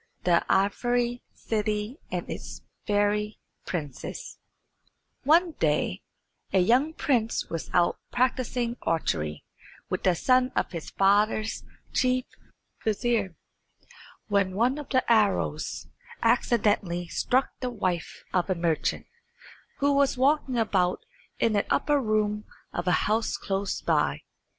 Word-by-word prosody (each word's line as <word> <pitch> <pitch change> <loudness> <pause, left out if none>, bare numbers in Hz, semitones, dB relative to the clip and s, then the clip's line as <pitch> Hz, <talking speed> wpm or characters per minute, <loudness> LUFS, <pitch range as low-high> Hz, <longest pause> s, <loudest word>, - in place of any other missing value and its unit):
"_ - - -37
The 175 -1 +3
Ivory 240 +5 +1
City 215 - -2
and - - -3
its - - -7 0.2
Fairy 210 0 +1 0.3
Princess 145 -7 -5 0.9
One 335 +4 +5
day 150 - +1 0.5
a - - +2
young 245 - +3
prince 235 -9 0
was 165 - -4
out 175 -1 +2
practising 245 -1 0
archery 75 - -1 0.5
with 185 - -1
the 185 -2 +3
son 255 +6 +3
of - - 0
his 165 -3 -6
father's 210 +3 +2 0.3
chief 255 0 +2 0.6
vizier, 220 -4 0 0.9
when 195 -2 +1
one 250 +7 +2
of 295 - -8
the 260 -2 +2
arrows 205 -9 +1 0.4
accidentally 205 -7 +2
struck 260 +9 +1
the 250 - -2
wife 185 -8 -3
of 180 0 +1
a 185 - +2
merchant, 170 -2 0 0.8
who 285 0 +4
was 280 -1 +3
walking 270 -1 +2
about 190 -5 +1 0.3
in 225 -2 +2
an 205 - +2
upper 290 -1 +2
room 215 -2 0 0.3
of - - -3
a 180 - +2
house 220 +2 +1
close 195 0 -2
by. - - +1
215 Hz, 120 wpm, -27 LUFS, 185-245 Hz, 0.9 s, One